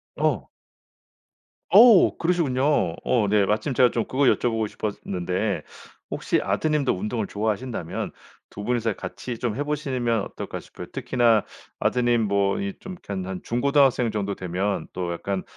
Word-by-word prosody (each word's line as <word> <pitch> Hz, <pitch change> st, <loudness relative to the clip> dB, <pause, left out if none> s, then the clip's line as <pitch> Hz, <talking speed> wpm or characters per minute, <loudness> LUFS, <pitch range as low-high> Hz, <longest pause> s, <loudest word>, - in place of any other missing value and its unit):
어. -, -, 0 dB, 1.2 s
어 235 Hz, -6 st, +7 dB
그러시군요. 145 Hz, -, +1 dB
어 115 Hz, -5 st, +2 dB
네. 105 Hz, -1 st, +4 dB
마침 110 Hz, +8 st, 0 dB
제가 125 Hz, 0 st, +4 dB
좀 115 Hz, -, -1 dB
그거 135 Hz, +2 st, 0 dB
여쭤보고 115 Hz, -3 st, +2 dB
싶었는데 100 Hz, -1 st, -3 dB, 0.5 s
혹시 -, -, 0 dB
아드님도 150 Hz, -4 st, +1 dB
운동을 105 Hz, +3 st, -3 dB
좋아하신다면 110 Hz, -3 st, -3 dB, 0.4 s
2 100 Hz, -, -8 dB
분이서 115 Hz, -3 st, 0 dB
같이 115 Hz, +6 st, -6 dB
좀 120 Hz, -4 st, -1 dB
해 145 Hz, -, -1 dB
보시면 130 Hz, -7 st, -1 dB
어떨까 -, -, -6 dB
싶어요. -, -, -10 dB
특히나 120 Hz, -4 st, +2 dB, 0.3 s
아드님 120 Hz, -2 st, +2 dB
뭐 100 Hz, -1 st, +1 dB
이 200 Hz, 0 st, -3 dB
좀 190 Hz, -1 st, -7 dB
그렇게 105 Hz, -, -8 dB
한 95 Hz, -2 st, -3 dB
한 95 Hz, -1 st, -5 dB
중고등학생 130 Hz, -1 st, +2 dB
정도 100 Hz, -2 st, -2 dB
되면 95 Hz, +3 st, -2 dB
또 90 Hz, -2 st, -3 dB
약간 95 Hz, +2 st, -3 dB
115 Hz, 310 characters per minute, -24 LUFS, 100-130 Hz, 1.2 s, 어